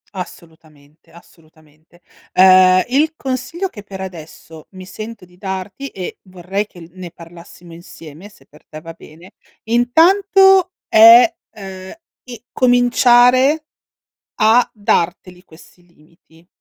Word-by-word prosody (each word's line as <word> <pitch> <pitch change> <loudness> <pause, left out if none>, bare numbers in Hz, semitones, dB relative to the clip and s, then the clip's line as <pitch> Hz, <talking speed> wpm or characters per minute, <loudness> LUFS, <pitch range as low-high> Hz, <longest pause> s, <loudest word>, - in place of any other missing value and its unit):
Assolutamente, 160 -4 -13
assolutamente. 160 0 -23 0.3
Uhm, 185 0 +5
il 305 +5 0
consiglio 270 +9 -5
che 205 - -12
per 195 -1 -12
adesso 165 -3 -12
mi 185 -1 -12
sento 215 +1 -11
di 180 0 -25
darti, 190 +7 -7
e 185 -8 -9
vorrei 190 +2 -6
che 175 - -17
l 165 - -14
ne 185 -2 -10
parlassimo 170 0 -16
insieme, 165 +2 -14
se 210 - -24
per - - -23
te 155 - -12
va 165 +1 -12
bene, 165 +3 -18 0.3
intanto 370 - +2
è, 230 +9 +6 0.2
uhm, 190 -2 -11 0.3
i 245 -1 -12
cominciare 245 +3 +2 0.7
a 225 +3 +2
darteli 180 -4 -3
questi 175 +1 -21
limiti. 165 0 -27
190 Hz, 120 wpm, -16 LUFS, 170-245 Hz, 0.7 s, è